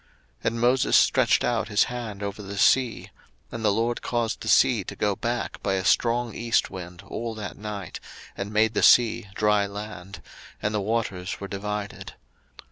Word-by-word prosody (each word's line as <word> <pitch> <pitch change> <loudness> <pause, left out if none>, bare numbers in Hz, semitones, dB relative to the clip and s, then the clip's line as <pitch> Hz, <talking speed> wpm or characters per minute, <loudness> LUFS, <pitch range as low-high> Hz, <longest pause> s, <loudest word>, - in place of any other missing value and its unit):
02:014:021 - - -19
And 115 0 0
Moses 125 +2 +4
stretched - - +3
out 120 -2 0
his 105 0 +3
hand 115 -5 -5
over 100 +1 -4
the 100 0 -7
sea; 125 +3 +2 0.4
and 115 - -6
the 105 - +4
LORD 115 +3 0
caused 120 -2 -2
the - - -6
sea 110 -1 +4
to - - -8
go 105 -2 0
back 120 +2 -3
by 95 - 0
a 95 -1 -2
strong 120 +2 +2
east 115 0 0
wind 90 -1 -8
all 115 +2 -4
that 105 -1 -6
night, 105 -4 -6 0.4
and 100 +1 -5
made 110 +1 +2
the - - 0
sea 115 -4 +5
dry 105 -1 +2
land, 100 -2 -8 0.4
and 105 - -2
the 105 - 0
waters 100 -4 -2
were 100 - -6
divided. 105 +1 -5
105 Hz, 180 wpm, -25 LUFS, 100-115 Hz, 0.4 s, sea